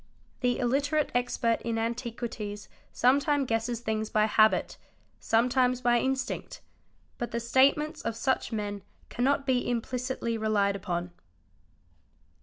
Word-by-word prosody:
The 245 -2 +1
illite 275 +4 0
rate 305 -2 +1
expert 245 -2 0
in 230 -1 -2
antiquities 225 -3 -4 0.2
sometime 280 +3 +2
guesses 230 0 -1
things 220 -1 -2
by 215 0 +3
habit, 215 0 +3 0.4
sometimes 250 +2 +2
by 240 -1 +3
instinct. 265 +1 -2 0.6
But 240 - -2
the 235 - -2
statements 275 +6 +2
of 230 -1 -3
such 265 +1 0
men 205 -2 -3 0.3
cannot 275 +3 +1
be 255 -3 +1
implicitly 240 -1 -2
relied 205 -2 +1
upon. 175 -2 -3
240 Hz, 120 wpm, -28 LUFS, 220-260 Hz, 0.6 s, by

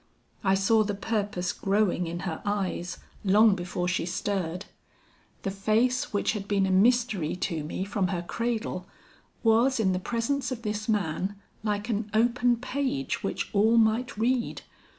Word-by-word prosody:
"I 190 0 +4
saw 215 +3 +4
the 205 -1 -2
purpose 205 -4 -2
growing 195 -3 +1
in 170 +1 -4
her 165 -4 -4
eyes 195 -3 -2 0.3
long 210 +2 +6
before 180 -1 -3
she 180 -1 0
stirred. 185 -1 -2 0.8
The 195 - -1
face 220 +6 +1
which 205 - +1
had 205 -2 -5
been 200 -2 +2
a 190 - 0
mystery 215 -4 +3
to 165 -4 -2
me 160 +5 -3
from 195 -2 0
her 175 -2 -2
cradle, 225 -3 -3 0.6
was 235 +3 +4
in 190 -4 +2
the 180 - 0
presence 235 +8 -1
of 235 -2 -5
this 215 0 -3
man, 195 -1 0 0.3
like 210 0 -2
an 215 -2 -2
open 240 +1 +3
page 275 +2 -2
which - - -3
all 220 +3 +4
might 225 +2 +2
read. 240 +2 0
205 Hz, 155 wpm, -27 LUFS, 190-230 Hz, 0.8 s, long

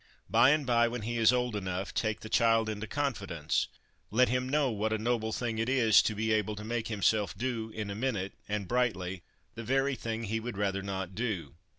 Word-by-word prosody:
By - - +6
and 150 0 +3
by, 120 -1 +4
when 120 -1 -4
he 120 +2 -2
is 115 0 +6
old 125 -2 0
enough, 95 -1 -3
take 110 -2 -1
the - - -7
child 115 0 +3
into 110 0 -4
confidence; 100 - -1 0.4
let 125 +4 +3
him 125 +1 0
know 145 -2 +2
what 110 0 -1
a 110 - +1
noble 110 0 0
thing 115 -1 -2
it 115 +2 0
is 120 -5 +5
to 110 - -1
be 110 +1 +1
able 105 0 0
to 105 - -7
make 115 0 -2
himself 105 -1 +1
do, 120 -3 -2
in 110 -2 -5
a - - -4
minute, 105 -5 -2 0.2
and 105 -2 -2
brightly, 95 -7 0 0.3
the 115 - -7
very 135 +3 +1
thing 115 -2 -4
he 110 +1 -1
would 115 -2 -6
rather 100 -1 0
not 95 -1 -4
do. 105 -5 -3
110 Hz, 215 wpm, -30 LUFS, 105-120 Hz, 0.4 s, By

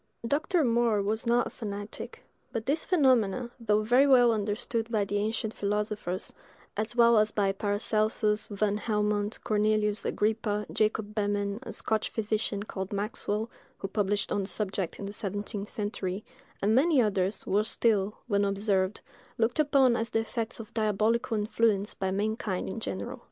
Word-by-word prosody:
Dr. 315 +5 +1
More 235 -3 +2
was 220 +4 -1
not 240 +1 +3
a - - -4
fanatic: 205 -2 -7 0.3
but 225 -1 -3
these 290 +4 0
phenomena, 255 - +2
though 215 -2 +2
very 250 +6 +5
well 245 -3 +6
understood 220 +2 -2
by 210 -3 +1
the 205 +1 -1
ancient 220 +1 -1
philosophers, 205 -2 -2 0.4
as 215 +3 -2
well 235 -2 +6
as 215 0 +3
by 200 -2 +1
Paracelsus, 210 +1 +1
Van 205 0 0
Helmont, 210 -1 0
Cornelius 210 0 +1
Agrippa, 210 -1 0
Jacob 215 -1 0
Behmen, 205 -1 -1
a - - -7
Scotch 220 -1 -1
physician 215 -2 -1
(called 190 -2 -5
Maxwell) 210 +1 -2 0.3
who 195 - -4
published 205 0 0
on 205 - +1
the 190 - -4
subject 195 -4 -2
in 200 - -6
the 200 - -5
seventeenth 205 0 -4
century, 205 -2 -3 0.4
and 210 +2 +3
many 290 +4 +4
others, 200 -3 +1
were 205 +2 +2
still, 210 -2 +1
when 205 -3 +1
observed, 200 -1 0 0.4
looked 230 +5 +1
upon 275 -5 +4
as 230 0 -1
the 225 - +1
effects 225 0 -2
of 220 -2 -9
diabolical 220 +1 +1
influence 210 -1 +1
by 190 - -2
mankind 205 -1 -1
in 210 - -4
general. - - -4
210 Hz, 155 wpm, -29 LUFS, 205-225 Hz, 0.4 s, well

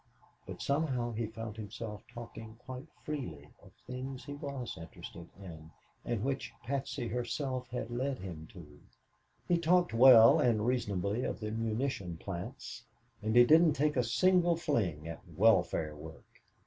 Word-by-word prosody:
But - - -6
somehow 140 -5 0
he 115 0 -2
found 115 -1 -7
himself 105 -1 -6
talking 115 -2 -9
quite 130 +1 -7 0.2
freely 85 - -5
of - - -17
things 130 +1 -6
he 145 - -6
was 140 -4 -5
interested 85 0 -10
in 80 -5 -10 0.3
and 115 -3 -2
which 135 0 -2
Patsy 135 -1 -3
herself 125 +1 -3
had 120 -1 -4
led 130 +2 -1
him 85 -4 -8
to. 75 -6 -13 0.7
He 175 -1 +3
talked 175 -2 +3
well 115 -1 +8
and 110 -3 +2
reasonably 110 -3 0
of - - -3
the 105 -1 -4
munition 110 -5 -2
plants, 90 0 -7 0.4
and 110 +1 -1
he 120 0 +9
didn't 160 +2 +6
take 150 +2 +1
a 125 - +3
single 175 +8 +3
fling 95 - -1
at 80 0 -7
"welfare 85 -6 +3
work." 80 +2 -11
115 Hz, 150 wpm, -32 LUFS, 100-135 Hz, 0.7 s, he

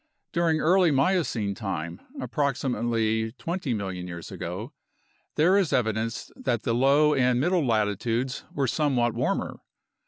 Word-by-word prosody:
During 165 -2 +2
early 180 +2 +4
Miocene 135 - +1
time 85 -5 -5 0.2
(approximately 115 - 0
20 165 -2 -3
million 95 -3 -4
years 85 -2 -8
ago) 100 - -6 0.6
there 170 +5 +4
is 185 -6 0
evidence 110 -1 -1
that 120 -4 -2
the 115 - 0
low 140 +5 +4
and 125 -3 +2
middle 175 +4 +2
latitudes 115 +2 0
were 140 - 0
somewhat 125 -4 +1
warmer. - - -2
125 Hz, 125 wpm, -26 LUFS, 110-150 Hz, 0.6 s, early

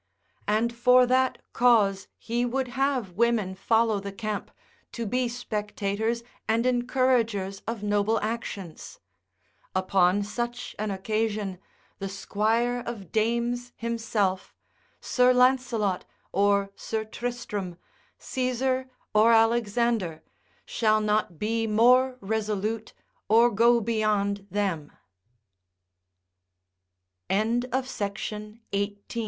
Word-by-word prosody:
And 220 +3 +1
for 250 +1 +5
that 260 +1 +2 0.2
cause 215 -6 +3
he 235 +1 -2
would 255 +1 -1
have 265 -5 0
women 220 -1 +1
follow 220 +2 +2
the 200 0 -6
camp, 215 0 -4 0.4
to 235 - -4
be 250 +4 0
spectators 220 -1 -2 0.2
and 230 +2 +1
encouragers 240 -6 +1
of 230 -2 -4
noble 205 +2 +1
actions: 210 -6 -5 0.8
upon 185 +1 +3
such 240 +3 -4
an 215 0 -1
occasion, 205 -1 -2 0.4
the 195 -1 -4
Squire 225 +5 0
of 205 -8 -6
Dames 235 +2 0
himself, 225 -5 -1 0.5
Sir 250 0 +3
Lancelot 250 -6 +2 0.3
or 200 0 +2
Sir 220 -1 -3
Tristram, 215 -6 -5 0.4
Caesar, 260 0 -1 0.2
or 220 +2 +6
Alexander, 225 -6 +2 0.4
shall 215 -1 +2
not 210 -5 0
be 225 +3 -1
more 250 +4 +4
resolute 215 +1 -2
225 Hz, 85 wpm, -27 LUFS, 205-240 Hz, 0.8 s, or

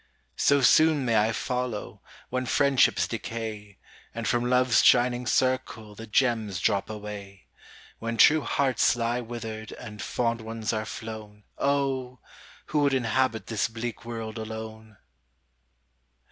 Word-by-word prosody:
So 140 0 +4
soon 155 +1 +5
may 115 -2 +1
I 110 +1 +3
follow, 125 -2 -4 0.3
When 130 0 -2
friendships 140 0 +3
decay, 110 -3 -6 0.4
And 115 -1 -3
from 120 0 +1
LoveŌĆÖs 125 -1 +3
shining 125 0 +4
circle 130 -4 0
The 115 +2 -10
gems 110 -5 +1
drop 100 +2 0
away. 105 -3 -8 0.5
When 115 0 -3
true 155 +8 +6
hearts 135 -3 +2
lie 120 +1 -1
withered 110 -2 -7
And 105 -3 -9
fond 115 -1 -1
ones 110 -1 -4
are 110 0 -2
flown, 110 -2 -8 0.2
Oh! 135 -3 0 0.5
who 150 - -1
would 140 -2 +3
inhabit 125 -1 0
This 110 -3 -1
bleak 115 +1 -6
world 115 -1 -6
alone? 110 -1 -8
115 Hz, 130 wpm, -27 LUFS, 110-125 Hz, 0.5 s, true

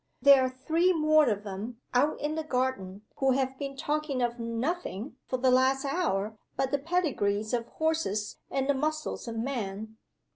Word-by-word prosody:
There 280 -1 +7
are 255 - +1
three 325 +8 +1
more 310 -3 +4
of 205 -1 -1
them, 210 +4 -6
out 285 +5 +2
in 295 +1 -1
the 320 0 -2
garden, 250 -9 -2
who 270 -1 +3
have 265 0 -1
been 275 -1 -5
talking 295 -2 -1
of 240 0 -1
nothing, 230 - -3
for 255 - -1
the 255 0 +3
last 260 +2 +3
hour, 220 - -1 0.2
but 265 0 0
the 285 - +1
pedigrees 265 - 0
of 235 -1 0
horses 315 -11 -1
and 270 0 -1
the 285 - +4
muscles 310 0 -2
of 230 -1 -4
men. 220 -3 -4
260 Hz, 175 wpm, -29 LUFS, 225-300 Hz, 0.2 s, There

